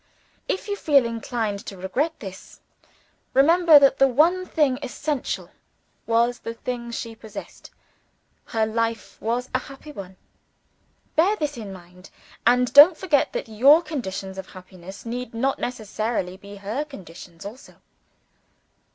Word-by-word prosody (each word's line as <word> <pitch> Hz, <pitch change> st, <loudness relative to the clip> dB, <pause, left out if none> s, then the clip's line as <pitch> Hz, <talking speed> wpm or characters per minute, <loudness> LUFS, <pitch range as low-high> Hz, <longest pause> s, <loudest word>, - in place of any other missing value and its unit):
If 380 Hz, -, -2 dB
you 405 Hz, -, -1 dB
feel 285 Hz, -9 st, +3 dB
inclined 230 Hz, -3 st, -3 dB
to 195 Hz, -, -7 dB
regret 250 Hz, -, -2 dB
this, 190 Hz, -3 st, -10 dB, 0.8 s
remember 325 Hz, +3 st, +7 dB
that 275 Hz, -1 st, +5 dB
the 270 Hz, -, +6 dB
one 335 Hz, +8 st, +3 dB
thing 280 Hz, -5 st, +1 dB
essential 285 Hz, +1 st, -3 dB, 0.6 s
was 235 Hz, +1 st, +2 dB
the 230 Hz, -, -6 dB
thing 235 Hz, 0 st, -5 dB
she 230 Hz, -1 st, -5 dB
possessed. 220 Hz, -1 st, -10 dB, 0.8 s
Her 225 Hz, -2 st, 0 dB
life 230 Hz, 0 st, -3 dB
was 240 Hz, +3 st, -1 dB
a 255 Hz, -, +2 dB
happy 275 Hz, +3 st, -11 dB
one. 190 Hz, -7 st, -9 dB, 1.0 s
Bear 365 Hz, +7 st, +4 dB
this 300 Hz, -7 st, -3 dB
in 215 Hz, -4 st, -7 dB
mind 180 Hz, 0 st, -13 dB, 0.4 s
and 250 Hz, 0 st, +3 dB
don't 300 Hz, +4 st, +9 dB
forget 310 Hz, -7 st, +1 dB
that -, -, -3 dB
your 270 Hz, +10 st, +5 dB
conditions 195 Hz, -, -5 dB
of 190 Hz, -, -8 dB
happiness 185 Hz, +2 st, -12 dB
need 240 Hz, 0 st, -5 dB
not 265 Hz, +4 st, 0 dB
necessarily 215 Hz, -5 st, -3 dB
be 200 Hz, +1 st, -12 dB
her 205 Hz, +8 st, -3 dB
conditions 180 Hz, -, -12 dB
also. 225 Hz, +7 st, -10 dB
235 Hz, 135 wpm, -24 LUFS, 200-285 Hz, 1.0 s, don't